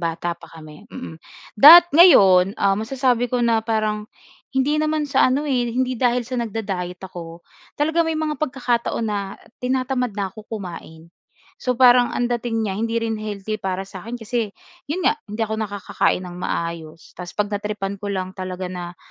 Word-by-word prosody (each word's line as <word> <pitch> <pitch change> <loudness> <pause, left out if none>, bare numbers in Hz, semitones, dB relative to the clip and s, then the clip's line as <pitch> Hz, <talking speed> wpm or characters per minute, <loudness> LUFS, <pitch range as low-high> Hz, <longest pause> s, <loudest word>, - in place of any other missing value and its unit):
bata 170 0 -2
pa - - -15
kami, 155 +5 -13
mm. 205 -12 -8 0.4
Dat 340 +4 +11
ngayon 195 - +6
um, 195 -1 +2
masasabi 245 0 0
ko 250 - +1
na 230 -1 +3
parang 215 -1 -2 0.4
hindi 265 +3 +1
naman 310 -1 0
sa 270 -1 +4
ano 270 +4 0
eh, 245 -4 0
hindi 255 +1 0
dahil 245 0 +1
sa 255 - -6
nagda-diet 195 -6 -4
ako. 170 -2 -9 0.4
Talaga 315 +3 +1
may 320 -1 -1
mga 310 -1 -1
pagkakataon 245 -5 -1
na 200 -2 -3 0.2
tinatamad 255 -2 -1
na 200 -1 -1
'ko 215 0 -12
kumain. 170 -6 -8 0.5
So 250 -1 -1
parang 245 -1 +6
ang 245 - 0
dating 235 -2 -1
niya 200 - -2
hindi 225 +4 -2
rin 225 -1 -2
healthy 215 0 -5
para 190 0 -3
sa'kin 205 +5 -8
kasi 230 -1 -2 0.4
'yon 355 +5 -2
nga - - +5 0.2
hindi 215 +2 -2
ako 220 0 -4
nakakakain 200 -3 -1
nang 180 0 -9
maayos. 170 -2 -5
Tas 180 -1 -9
'pag 210 0 -1
na-tripan 200 -1 -4
ko 205 - -5
lang 185 -2 -3
talaga 185 -1 -6
na 180 -1 -6
220 Hz, 175 wpm, -21 LUFS, 190-250 Hz, 0.5 s, Dat